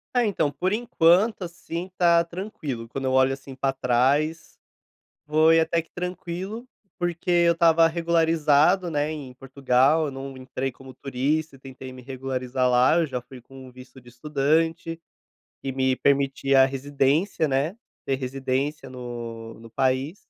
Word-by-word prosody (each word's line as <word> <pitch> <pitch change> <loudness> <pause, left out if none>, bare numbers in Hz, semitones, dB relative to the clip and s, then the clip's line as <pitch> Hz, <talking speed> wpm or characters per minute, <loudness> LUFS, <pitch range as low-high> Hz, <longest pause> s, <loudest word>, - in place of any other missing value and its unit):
Ah, 245 - +4
então, 155 -8 0
por 185 +6 -2
enquanto, 210 -2 +2
assim, 170 0 -6
tá 170 -1 +4
tranquilo, 165 - -6
quando 135 +3 -5
eu 130 - +1
olho, 130 0 +4
assim, 135 0 -10
pra 135 0 -1
trás, 135 +6 0 0.7
foi 160 +2 +4
até 165 0 +1
que - - -32
tranquilo, 180 +6 -5 0.3
porque 175 +1 -3
eu 170 -1 +4
estava 165 -1 +4
regularizado, 165 +1 +2
né, 150 -1 -1
em 140 -5 -8
Portugal, 135 +3 +2
eu 145 - -4
não 135 0 -7
entrei 130 +1 -4
como 130 0 -14
turista, 140 +2 -2
tentei 130 -1 -10
me 130 - -11
regularizar 130 0 -2
lá, 125 +5 +4
eu 170 - +2
já 130 -4 -4
fui 125 +1 -13
com 130 +2 -13
um - - -13
visto 130 +1 -14
de 120 - -16
estudante 155 +5 -1 0.6
e 135 - -3
me 130 0 +1
permitia 135 0 +2
a - - +3
residência, 140 +6 0
né, 145 +8 -1 0.3
ter 135 - 0
residência 135 +2 -3
no 120 -2 -7
no 115 0 -13
país. 135 - 0
140 Hz, 155 wpm, -24 LUFS, 130-165 Hz, 0.7 s, Ah